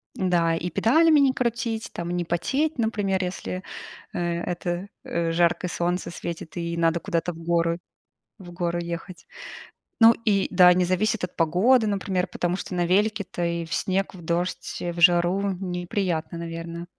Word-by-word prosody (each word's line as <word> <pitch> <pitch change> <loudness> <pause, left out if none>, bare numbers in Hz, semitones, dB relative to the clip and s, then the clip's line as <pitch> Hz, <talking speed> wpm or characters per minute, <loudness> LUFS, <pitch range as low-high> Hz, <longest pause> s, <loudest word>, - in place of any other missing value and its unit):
Да, 175 -3 +2
и 165 +2 -3
педалями 310 - +4
не 275 -2 +4
крутить, 235 -3 -2
там 170 0 -5
не 175 0 -1
потеть, 265 - -1
например, 205 -4 0
если, 180 0 -4 0.5
э, - - -4
это, 175 +2 -2 0.2
э, 170 -1 -1
жаркое 175 +1 +1
солнце 175 +1 -1
светит 170 -1 -7
и 170 0 -3
надо 165 0 +2
куда-то 170 +2 -1
в 165 - -12
горы, 170 0 0 0.6
в 180 -4 -11
гору 175 -1 -2
ехать. 170 +1 -7 0.7
Ну 225 0 +9
и 200 -3 +2
да, 180 -1 +7
не 180 0 +2
зависит 195 +5 0
от 180 - -7
погоды, 205 +9 +3
например, 195 -3 -1
потому 175 0 -2
что 190 - -6
на 175 -1 +1
велике-то 200 -1 0
и 170 0 -1
в 165 - -11
снег, 195 +1 -1
в 180 - -11
дождь, 175 +2 -2
в 175 0 -4
жару 175 +3 +4
неприятно, 180 -2 -3
наверно 165 0 -6
175 Hz, 160 wpm, -25 LUFS, 170-195 Hz, 0.7 s, Ну